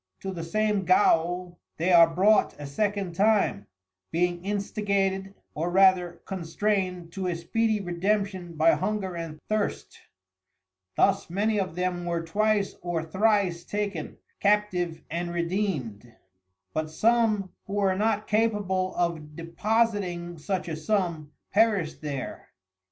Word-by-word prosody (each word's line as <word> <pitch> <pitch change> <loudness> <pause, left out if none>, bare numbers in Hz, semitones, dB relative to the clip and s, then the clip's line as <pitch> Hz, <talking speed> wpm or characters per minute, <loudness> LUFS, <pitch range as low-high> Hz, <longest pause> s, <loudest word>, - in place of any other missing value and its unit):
To 195 - -4
the 170 -3 -5
same 210 +3 0
Gaol 175 -1 +2 0.2
they 170 +3 +1
are 170 -1 +8
brought 195 +4 +3
a 145 - -6
second 200 +4 -1
time, 200 - +2 0.4
being 175 +1 0
instigated 200 -1 -1 0.2
or 165 +3 -2
rather 180 -2 +3
constrained 185 -1 -2
to 190 +1 -3
a 175 - -1
speedy 215 +6 0
Redemption 190 -1 -1
by 160 +1 +5
hunger 190 -2 -1
and 165 -2 -6
thirst; 215 -1 -2 1.0
Thus 195 -2 +2
many 210 +4 +1
of 185 -4 -3
them 180 -1 -2
were 170 -1 -1
twice 205 +4 +1
or 175 -2 -2
thrice 190 0 +1
taken, 205 -6 -4 0.3
captiv'd 200 -5 +1
and 175 +1 -2
Redeedmed; 170 - -2 0.6
but 155 0 -2
some 215 +1 +2 0.2
who 195 - -6
were 200 -2 +2
not 215 +2 0
capable 205 -4 0
of 160 -4 -2
Depositing 175 -1 -1
such 185 +3 -2
a 160 - -3
sum, 165 -3 -1 0.2
perished 200 -7 +2
there. 140 -3 -5
185 Hz, 125 wpm, -27 LUFS, 170-205 Hz, 1.0 s, are